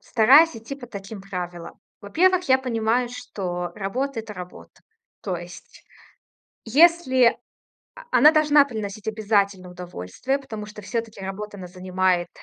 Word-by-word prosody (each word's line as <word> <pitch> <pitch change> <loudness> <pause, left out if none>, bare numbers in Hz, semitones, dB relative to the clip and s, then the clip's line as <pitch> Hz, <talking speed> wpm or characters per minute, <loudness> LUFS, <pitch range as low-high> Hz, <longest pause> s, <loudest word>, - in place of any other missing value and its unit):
стараюсь 275 +7 +5
идти 225 +5 -7
по 260 -3 -11
таким 200 -1 -8
правилам. 180 -3 -7 0.2
Во-первых, 360 - +2
я 260 - +5
понимаю, 240 -1 0
что 180 -8 -5
работа- 230 +5 -3
это 220 -1 -10
работа. 180 -1 -11 0.4
То 185 -3 -2
есть 175 +1 -12 0.8
если 260 -2 +4 0.6
о - - -12
она 300 - +7
должна 300 -2 +5
приносить 220 -4 -6
обязательно 200 -4 0
удовольствие, 180 - -4
потому 220 -6 -8
что 210 0 -11
всё-таки 225 0 -4
работа, 205 +2 -6
она 185 - -8
занимает, 185 -1 0
215 Hz, 130 wpm, -23 LUFS, 185-260 Hz, 0.8 s, она